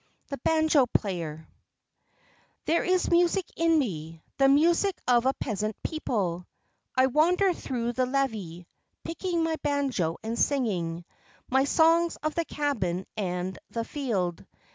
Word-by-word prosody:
THE 280 - -5
BANJO 315 -2 +3
PLAYER 165 -6 -2 1.2
There 335 - +2
is 365 0 +1
music 350 +2 +3
in 330 -1 +3
me, 165 - -3 0.2
the 270 - +6
music 340 +7 +3
of 245 0 +4
a 265 - +3
peasant 215 -2 -3
people. 195 - -2 0.5
I 260 - +6
wander 350 +8 +3
through 240 -6 -3
the 255 +1 0
levee, 215 -11 -2 0.4
picking 340 0 -2
my 325 -1 0
banjo 270 - 0
and 225 +1 -3
singing 175 -11 0 0.5
my 265 +1 +4
songs 330 +3 +3
of 310 0 -1
the 335 -1 -1
cabin 190 - -2
and 185 -2 -3
the 230 -1 -3
field. 205 - -2
260 Hz, 130 wpm, -27 LUFS, -, 1.2 s, the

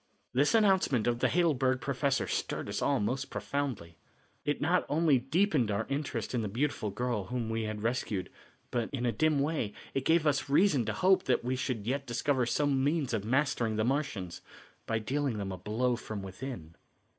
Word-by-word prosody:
This 140 - +3
announcement 190 - +3
of 120 0 +1
the - - +3
Heidelberg 140 -7 +2
professor 135 -4 0
stirred - - -2
us - - -2
all 140 -2 +2
most 130 +6 -1
profoundly. 125 -13 -3 0.5
It 145 - -1
not 175 +4 +2
only 150 -3 +3
deepened 140 - +1
our 105 +1 0
interest 140 -1 -2
in 120 - +1
the 110 - -2
beautiful 120 0 -1
girl 110 -1 -2
whom 115 0 -3
we 110 0 -1
had 110 -1 -4
rescued, 110 -5 -1 0.4
but, 120 -2 -1
in 125 -3 -2
a 120 - +2
dim 155 +7 +2
way, 140 -8 -1 0.2
it 135 - -1
gave 160 +2 +3
us 140 -2 +1
reason 145 - +4
to - - -1
hope 190 0 +3
that 125 - +2
we 125 +2 0
should 125 -5 -3
yet 135 +3 -2
discover 125 +1 +1
some 140 0 +1
means 145 -3 0
of 110 -3 0
mastering 120 -2 +1
the 110 - +1
Martians 125 - -2 0.5
by 115 - +1
dealing 130 +2 -1
them 100 -2 -3
a 95 - -5
blow 115 +6 0
from 110 -4 -6
within. 95 -4 -7
130 Hz, 190 wpm, -31 LUFS, 110-145 Hz, 0.5 s, reason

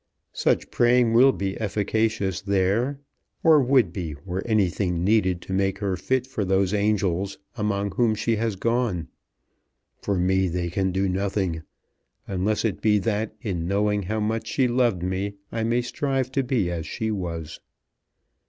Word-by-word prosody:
"Such - - 0
praying 120 -1 +3
will 130 +4 +7
be 95 -5 -3
efficacious 105 -2 0
there, 100 +7 +1 0.5
or 160 -3 +6
would 125 -8 +3
be 85 -6 -4
were 95 0 -3
anything 95 -5 +1
needed 95 -3 +2
to 95 - -5
make 95 0 +1
her 100 -2 -1
fit 130 +5 0
for 130 -5 -3
those 95 0 +1
angels 100 -2 0 0.2
among 100 -1 -1
whom 115 +2 +2
she 110 +1 0
has 110 -1 -1
gone. 115 -4 -1 0.9
For 100 -2 -1
me 95 +1 +2
they 85 0 -2
can 95 +1 0
do 95 +2 0
nothing, 95 -3 -1 0.7
unless 100 +4 0
it 105 -4 -1
be 105 -1 +4
that 105 +1 -1
in 90 -6 -2
knowing 105 +1 +1
how 105 +4 -2
much 110 +1 -1
she 130 +2 +1
loved 120 -7 +1
me 95 +2 -2 0.2
I 115 -1 -2
may 120 +2 +1
strive 135 +1 -1
to 135 - +1
be 120 -9 0
as 85 -2 -4
she 110 0 -2
was." 85 -6 -4
100 Hz, 160 wpm, -24 LUFS, 95-115 Hz, 0.9 s, will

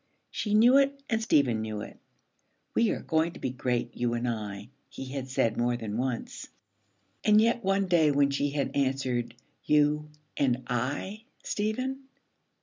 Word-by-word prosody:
She 210 -1 -1
knew 240 +5 +7
it 275 0 +2
and 225 0 +1
Stephen 135 - +2
knew 110 -1 -4
it. - - -10 0.7
'We 230 -1 +3
are - - -2
going 160 +1 +1
to - - -11
be 130 - -2
great, 125 -2 -2
you 120 -1 0
and 120 +1 -2
I,' 105 -2 -4 0.2
he 135 - -7
had 130 0 -5
said 115 -3 +1
more 120 0 +1
than 110 -3 -5
once. 125 0 -3 0.8
And 210 0 +6
yet 235 +1 +2
one 195 +1 +2
day 170 -4 +4
when 140 -1 +3
she 140 +1 0
had 140 -1 -2
answered, 130 -3 0 0.3
'You 150 0 +2 0.3
and 130 -2 +1
I, 145 - -3 0.2
Stephen?' 260 +1 -2
140 Hz, 160 wpm, -28 LUFS, 120-205 Hz, 0.8 s, knew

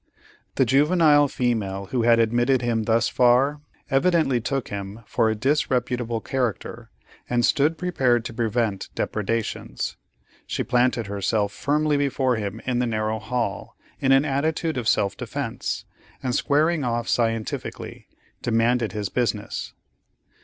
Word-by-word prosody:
The 130 - +3
juvenile 145 +2 +4
female 105 -7 -1
who 125 - +1
had 115 0 +5
admitted 120 +3 +2
him 115 -2 0
thus 115 +1 +2
far, 130 +4 +3 0.3
evidently 135 -3 +2
took 135 +1 -2
him 100 +2 -6
for 110 - +1
a 110 - 0
disreputable 125 -2 0
character, 125 -6 -3 0.4
and 120 -1 +2
stood 155 +2 +2
prepared 130 -10 +1
to 115 - -5
prevent 115 -3 -1
depredations. 110 +1 -3 0.5
She - - -2
planted 125 -2 +1
herself 100 +1 -1
firmly 150 +3 +1
before 135 -2 +1
him 105 +1 -4
in 125 -1 0
the 125 - +1
narrow 110 -1 -1
hall 110 -3 -3 0.2
in 135 - +2
an 135 +2 +5
attitude 155 +3 -1
of 120 -3 0
self 100 -2 +1
defence, - - -4 0.4
and 125 -2 -1
squaring 155 +4 +2
off 120 -1 -1
scientifically, 115 -2 -2 0.3
demanded 115 0 +1
his 105 -2 -3
business. 115 -4 -2
120 Hz, 130 wpm, -24 LUFS, 110-135 Hz, 0.5 s, had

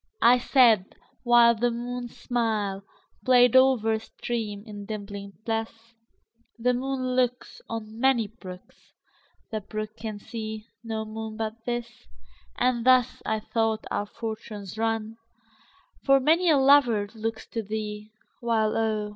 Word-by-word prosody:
I 245 +1 +7
said 235 -7 +4 0.3
(whileThe 240 -1 +5
moon's 245 0 -5
smilePlay'd 230 +2 +1
o'er 260 -4 +5
a 220 - 0
stream, 220 -2 -5
in 205 -2 -9
dimpling 200 -2 -6
bliss),The 230 +1 -5
moon 255 0 -2
looksOn 230 -3 -3
many 260 -3 +3
brooks, 190 -4 -13 0.6
The 215 -1 -2
brook 215 +1 -6
can 220 -2 -5
see 220 0 -6 0.2
no 220 -1 -3
moon 220 0 -6
but 225 0 -4
this; 240 -1 -5 0.5
And 245 -2 +1
thus, 255 -1 +4
I 220 0 0
thought, 225 0 -1
our 205 0 -1
fortunes 220 -3 -7
run, 225 0 -2 0.9
For 275 0 +5
many 325 +6 +3
a 305 - +5
lover 265 -6 +5
looks 225 0 -4
to 230 - -3
thee, 210 0 -5 0.3
While 225 -2 +1
oh! 215 -2 0
225 Hz, 120 wpm, -26 LUFS, 215-245 Hz, 0.9 s, I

